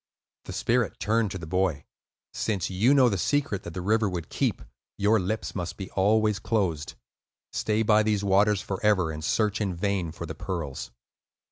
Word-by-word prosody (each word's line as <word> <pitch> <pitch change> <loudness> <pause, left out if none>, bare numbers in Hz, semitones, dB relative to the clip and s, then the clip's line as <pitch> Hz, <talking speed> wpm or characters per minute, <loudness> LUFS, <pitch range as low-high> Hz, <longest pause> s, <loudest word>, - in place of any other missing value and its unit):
The - - -6
spirit 120 -2 0
turned 110 0 +1
to 95 - -5
the 85 - -7
boy. 90 -4 0 0.5
"Since 100 -4 -1
you 105 +8 +3
know 130 -3 +6
the 100 -5 0
secret 140 -5 0
that 85 -2 -9
the 90 - -4
river 110 +1 +2
would 85 -4 -5
keep, - - -1 0.3
your 105 +2 +3
lips 105 +4 -3
must 90 -3 -4
be 95 - -7
always 105 +1 +2
closed. 90 -11 -1 0.6
Stay 110 +1 +1
by 110 0 +5
these 105 -1 +1
waters 100 +1 +3
forever, 95 -3 +1
and 80 0 -6
search 110 +5 +1
in 95 -4 -1
vain 95 -2 -1
for 85 +1 -7
the 80 - -6
pearls." 80 -4 -5
100 Hz, 175 wpm, -27 LUFS, 90-110 Hz, 0.6 s, know